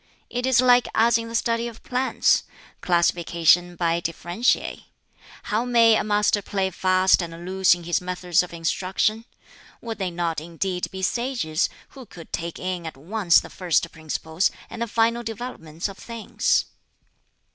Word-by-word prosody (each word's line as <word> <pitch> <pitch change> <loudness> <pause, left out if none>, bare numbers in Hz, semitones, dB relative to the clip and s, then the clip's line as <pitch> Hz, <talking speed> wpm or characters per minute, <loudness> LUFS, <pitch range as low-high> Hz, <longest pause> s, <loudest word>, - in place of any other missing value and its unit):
It 245 +1 -1
is 260 -1 +4
like 245 -1 +5
as 230 +1 +4
in 230 - -6
the 230 - -6
study 230 0 0
of 230 -2 -11
plants 255 +1 +2 0.4
classification 175 0 +2
by 170 -1 +1
differentiae. 175 +7 -1 0.6
How 215 +3 -1
may 230 -2 +5
a - - +1
master 210 0 +2
play 190 -1 -2
fast 185 +1 +3
and 170 0 -7
loose 190 -1 +3
in 175 - -11
his 175 +1 0
methods 180 -1 +1
of 180 - -7
instruction? 185 +6 -1 0.5
Would 225 -2 -6
they 190 -2 -1
not 170 -2 -2
indeed 180 +2 -3
be 190 0 -7
sages, 235 -8 0 0.2
who 260 -4 -12
could 170 -3 -13
take 170 0 -4
in 180 -2 -4
at 160 - -8
once 180 +4 +3
the - - -11
first 175 -2 0
principles 160 +2 -1 0.2
and 230 - -7
the 235 - 0
final 230 +2 +1
developments 215 -8 -5
of 195 -1 -11
things?" 230 -2 0
185 Hz, 155 wpm, -24 LUFS, 170-230 Hz, 0.6 s, like